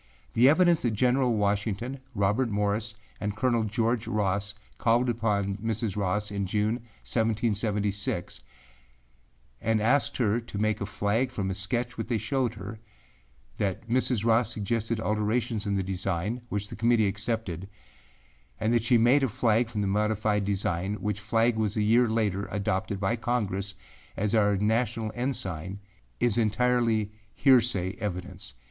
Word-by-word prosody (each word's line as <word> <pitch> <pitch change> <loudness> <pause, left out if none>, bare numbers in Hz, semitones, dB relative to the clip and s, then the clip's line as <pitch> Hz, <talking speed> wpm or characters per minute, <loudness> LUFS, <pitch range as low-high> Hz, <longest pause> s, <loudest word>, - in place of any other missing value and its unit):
The 125 +3 +6
evidence 175 +1 +4
that 115 -3 0
General 125 0 +2
Washington, 105 +5 -1 0.2
Robert 105 +5 +1
Morris 105 +1 -1 0.2
and 105 0 -3
Colonel 120 -1 +1
George 115 +2 0
Ross 100 -1 -1 0.2
called 120 +2 +3
upon 105 -4 0
Mrs. 110 -1 -2
Ross 105 +1 -1
in 100 -1 -2
June, 105 +4 0 0.3
1776, 105 - -1 1.2
and 110 0 +1
asked 125 +7 +2
her 115 -2 +2
to 115 -3 -8
make 110 0 0
a 100 - -2
flag 105 +5 0
from 100 -6 -3
a - - -1
sketch 120 +6 -3
which - - -3
they 120 - 0
showed 120 +2 -1
her, 100 +2 -8 0.8
that 100 +2 -2
Mrs. 120 -2 +1
Ross 115 0 +3
suggested 110 +1 -1
alterations 110 +1 -1
in 100 - 0
the 95 - 0
design, 95 +4 -2
which 105 0 -2
the - - -7
Committee 115 -1 +3
accepted, 100 -3 -3 0.9
and 110 +2 +1
that 120 - +3
she 120 +2 +4
made 120 +5 +5
a 135 - +2
flag 115 +2 +2
from 110 -3 -3
the 100 - 0
modified 105 +1 +1
design 95 -1 -1
which 105 0 -3
flag 115 +2 +1
was 110 -1 -1
a 105 - +2
year 115 +3 +4
later 105 -3 0
adopted 100 -1 -1
by 100 +4 +1
Congress 100 -5 -2 0.4
as 105 +2 0
our 105 -2 +3
national 110 +1 0
ensign, 95 - -3 0.4
is 120 -2 +2
entirely 115 -1 +2 0.2
heresay 120 -8 +3
evidence. 95 - -6
110 Hz, 150 wpm, -28 LUFS, 100-115 Hz, 1.2 s, The